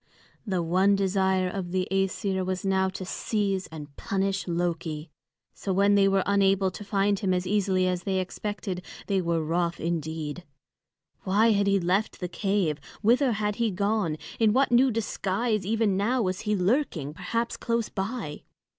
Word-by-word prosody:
The 185 -3 0
one 185 +4 +3
desire 190 -1 +1
of 180 -1 -4
the 185 0 0
Æsir 195 0 0
was 185 +1 -3
now 190 0 +2
to 190 0 -6
seize 195 -1 -1
and 150 -3 -10
punish 195 0 -1
Loki. 170 -3 -2 0.4
So 195 - -4
when 200 +2 +4
they 200 -1 +5
were 195 -1 +2
unable 195 -1 +3
to 205 - -8
find 200 0 +1
him 185 -2 +1
as 180 0 -1
easily 190 -2 +1
as 180 -1 0
they 190 +1 -1
expected, 190 0 -4 0.2
they 195 -2 +1
were 170 -2 0
wroth 170 +1 0
indeed. 160 0 -3 0.8
Why 215 +4 +3
had 200 -1 +2
he 200 0 +3
left 185 +5 0
the 180 - -3
cave? 185 -4 0 0.2
Whither 245 +3 +4
had 210 -1 -1
he 230 -1 +1
gone? 200 -4 0 0.2
In 220 -2 +4
what 265 0 +3
new 250 +2 +5
disguise 215 -2 -1
even 220 -3 +2
now 235 +5 +1
was 185 -1 -1
he 210 - +3
lurking, 185 - 0
perhaps 230 +8 -2
close 230 -1 -1
by? 195 -6 -4
195 Hz, 165 wpm, -27 LUFS, 180-210 Hz, 0.8 s, they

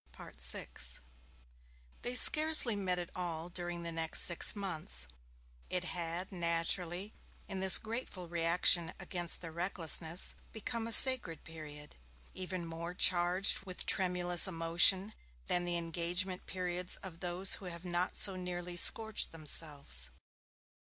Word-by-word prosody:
VI - - -2 1.4
They 245 +1 -6
scarcely 305 -5 +6
met 185 -3 -5
at 175 -1 -9
all 170 -2 -7
during 175 -1 -8
the 170 - -7
next 165 0 -2
six 170 +4 0
months 160 - -7 0.6
it 180 -1 -4
had, 175 +1 -8
naturally, 175 +2 -4 0.3
in 195 - -8
this 190 -1 +5
grateful 220 -5 -9
reaction 170 0 0
against 175 -2 -2
their 165 -2 -9
recklessness, 170 -1 +1 0.2
become 230 +1 -6
a - - -8
sacred 235 -9 +6
period, 150 -2 -14 0.4
even 185 -1 -8
more 170 +2 -10
charged 180 +2 +2
with 185 - -7
tremulous 180 -2 +5
emotion 180 +4 +2 0.3
than 175 0 -3
the 175 0 -3
engagement 175 +2 -4
periods 180 -1 -3
of 175 -4 -12
those 180 +1 +2
who - - -12
have 170 0 -11
not 175 +1 -4
so 195 - +4
nearly 180 -1 -9
scorched 220 +4 +3
themselves. 145 - +2
175 Hz, 125 wpm, -30 LUFS, 165-185 Hz, 1.4 s, scarcely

